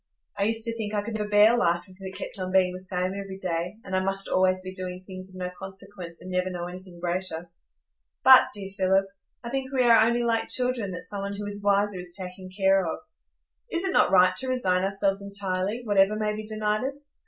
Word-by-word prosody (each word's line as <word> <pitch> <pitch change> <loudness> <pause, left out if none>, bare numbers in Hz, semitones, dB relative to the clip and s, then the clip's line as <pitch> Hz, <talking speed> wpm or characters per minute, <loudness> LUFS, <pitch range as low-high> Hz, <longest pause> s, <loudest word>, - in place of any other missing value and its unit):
I 200 - 0
used 225 +1 +1
to 230 0 0
think 215 -2 -4
I 205 - 0
could 230 +1 -5
never 210 -1 -3
bear 210 +3 +6
life 175 -7 +1
if 185 - -16
it 190 0 -7
kept - - -6
on 185 0 -3
being 185 -1 +3
the 185 - -6
same 185 0 -1
every 195 -1 -6
day, 180 +1 -3
and 190 -1 -4
I 185 - +1
must 195 0 0
always 185 0 +2
be 185 0 -7
doing 185 -1 -6
things 185 0 -8
of 185 - -14
no 180 -1 -4
consequence, 190 -3 -9
and 185 - -8
never 180 0 0
know 175 -1 -4
anything 180 0 -10
greater. 175 -1 -3 0.7
But, 260 -1 +9
dear 195 -1 -6
Philip, 190 +1 +3 0.4
I 235 - -6
think 265 0 -2
we 260 -2 +2
are 230 -2 +7
only 235 +1 +2
like 225 -1 0
children 250 -5 0
that 180 - -6
some 200 -1 -3
one 200 0 -4
who 205 - -5
is 205 0 -6
wiser 200 -1 +2
is 180 -1 -5
taking 185 0 -8
care 195 0 +3
of. 165 - -3 0.7
Is 340 +1 0
it 380 -1 0
not - - +4
right 185 -1 +5
to 260 - -3
resign 185 -8 +2
ourselves 195 0 0
entirely, 200 +2 -2
whatever 205 -1 +4
may 215 0 -1
be 215 0 -7
denied 215 0 -1
us? 285 +2 -5
195 Hz, 230 wpm, -26 LUFS, 185-215 Hz, 0.7 s, But